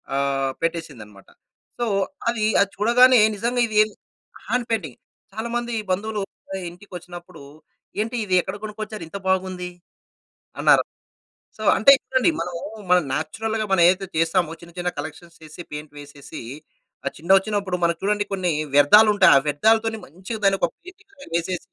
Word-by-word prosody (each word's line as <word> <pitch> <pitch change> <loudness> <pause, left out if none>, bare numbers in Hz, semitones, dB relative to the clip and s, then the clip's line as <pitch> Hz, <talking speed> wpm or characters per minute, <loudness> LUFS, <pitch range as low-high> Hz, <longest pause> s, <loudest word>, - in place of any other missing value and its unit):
ఆహ్, 135 -1 0
పెట్టేశిందన్నమాట. 125 - -5 0.5
సో 240 - 0 0.4
అది 235 -2 -1 0.2
అది 200 - +2
చూడగానే 240 +4 +5 0.2
నిజంగా 240 +3 0
ఇది 215 -1 -3
ఏం 215 - -5 0.6
హ్యాండ్ 250 -1 -1
పెయింటింగ్. 160 - -3 0.3
చాలా 220 +2 -4
మంది 240 0 -2 0.2
బంధువులు 210 +2 -2 0.5
ఇంటికొచ్చినప్పుడూ 175 -3 -11 0.6
"ఏంటి? 225 +3 -3
ఇది 185 -2 +1
ఎక్కడ 190 +2 -6
కొనుకొచ్చారు? 215 -2 -7
ఇంత 200 - -7
బాగుంది." 185 -1 -1 0.9
అన్నారు. - - +5 0.7
సో 215 - -9
అంటే 220 +7 +7
చూడండి 260 +5 +2
మనమూ 170 -1 -4 0.3
మనం 180 0 +5
నేచురల్‌గా 220 +9 -2
మనం 180 -3 +4
ఏదైతే 190 +2 +1
చేస్తామో 165 0 +1
ఆ - - -34
చిన్న 170 0 -14
చిన్న 180 0 -1
కలెక్షన్స్ 160 +3 -8
చేసి, 155 +3 -10
పెయింట్ 150 0 -7
వేసేసి, 145 -1 -10 0.7
ఆ - - +4
చిన్న 170 +3 -9
వచ్చినప్పుడు 200 -2 -2
మనం 170 0 +1
చూడండి 205 +1 0
కొన్ని 185 -3 0 0.2
వ్యర్థాలుంటాయి. 205 +7 +6
ఆ - - -3
వ్యర్థాలతోని 220 +8 +2
మంచిగా 190 - -8
దాన్ని 195 0 +3
ఒక - - +2
పెయింట్‌గ్‌లాగా 370 -3 -16
వేసేసి 175 +1 -2
190 Hz, 145 wpm, -22 LUFS, 170-220 Hz, 0.9 s, అంటే